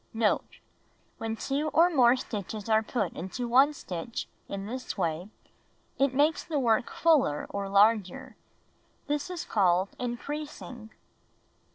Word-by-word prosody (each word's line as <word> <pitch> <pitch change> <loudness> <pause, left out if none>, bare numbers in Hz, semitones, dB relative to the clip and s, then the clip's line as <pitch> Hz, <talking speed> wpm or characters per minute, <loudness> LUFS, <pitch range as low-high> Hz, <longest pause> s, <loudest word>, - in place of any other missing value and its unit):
Note. 225 -2 0 0.3
— - - -36
Wlien 225 0 -3
2 285 +3 -1
or 345 +2 +6
more 250 -5 +5
stitches 215 -4 -5
are 220 -1 +4
put 210 -3 -2
into 215 +8 -5
1 265 +5 +5
stitch 185 0 -5 0.2
in 195 0 -4
this 250 +3 -5
way, 170 +1 -2 0.7
it 270 -1 +2
makes 300 +3 +3
the 315 -3 -3
work 235 -3 +2
fuller 295 - +2
or 200 -1 -3
larger. 220 +5 +2 0.7
This 295 +3 -2
is 360 -2 -5
called 185 -2 +2
"increasing." 250 -2 -6
235 Hz, 135 wpm, -28 LUFS, 200-275 Hz, 0.7 s, or